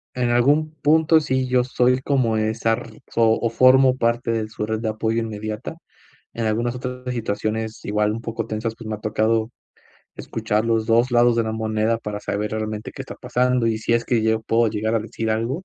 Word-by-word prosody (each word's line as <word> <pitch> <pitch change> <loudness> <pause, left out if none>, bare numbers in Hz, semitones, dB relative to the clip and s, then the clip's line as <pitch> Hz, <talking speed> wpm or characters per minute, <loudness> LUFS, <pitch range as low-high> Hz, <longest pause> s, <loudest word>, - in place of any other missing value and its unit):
en 120 -1 0
algún 145 +6 +3
punto, 160 +1 +4
sí, 130 -2 -1
yo 125 -1 +2
soy 125 0 +1
como 130 -5 +1
esa 110 +1 0
r 110 -1 -7
fo 115 -1 +2
formo 130 +2 +5
parte 115 -1 0
de 110 -1 -2
su 105 -1 -4
red 110 0 -2
de 110 -1 -2
apoyo 110 +1 -1
inmediata. 110 +3 -5 0.6
En 115 - -3
algunas 120 +3 0
otras 125 0 -6
situaciones 110 -1 -3
igual 105 0 0
un 115 - -5
poco 115 -1 -4
tensas, 110 +1 -3
pues, 115 - -9
me 110 - -2
ha 105 - -13
tocado 110 +1 +1 0.7
escuchar 110 -1 -2
los 115 -1 +1
2 120 +3 +3
lados 120 0 +4
de 115 - +3
la 110 - -3
moneda 110 0 0
para 105 -2 -5
saber 105 +1 -3
realmente 110 -1 -4
qué - - -7
está - - -9
pasando, 125 -1 +1
y 115 -1 +1
si 110 - -1
es 115 0 +2
que 120 -3 +1
yo 110 0 +1
puedo 115 +1 +2
llegar 110 +1 -1
a - - +3
decir 110 0 -4
algo. 120 +11 -2
115 Hz, 205 wpm, -22 LUFS, 110-120 Hz, 0.7 s, formo